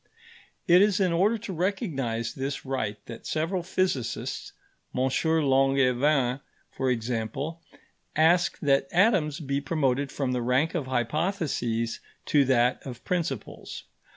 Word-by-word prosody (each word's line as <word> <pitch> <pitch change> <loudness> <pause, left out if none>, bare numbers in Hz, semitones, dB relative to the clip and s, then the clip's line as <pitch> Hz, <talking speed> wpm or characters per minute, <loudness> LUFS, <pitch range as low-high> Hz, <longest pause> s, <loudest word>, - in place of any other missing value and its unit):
It 175 +1 +7
is 205 -1 +3
in 185 -3 +2
order 200 +7 +3
to 210 -3 -6
recognise 150 - -2
this 135 +1 -4
right 120 -6 -2
that 115 -1 -9
several 165 +4 -1
physicists 180 -7 -2 0.5
M. - - +1
Langevin, 135 -3 +2 0.3
for 130 -1 -1
example 125 +7 -2 0.5
ask 170 +3 +3
that 135 -2 +2
atoms 175 -6 +3
be 140 -2 -2
promoted 140 -2 0
from 135 -3 -2
the 125 -1 -1
rank 125 +7 +1
of 155 -7 -2
hypotheses 125 - -1 0.3
to 145 -2 +3
that 125 -1 +2
of 125 -3 -8
principles. 165 - -3
140 Hz, 125 wpm, -27 LUFS, 125-170 Hz, 0.5 s, It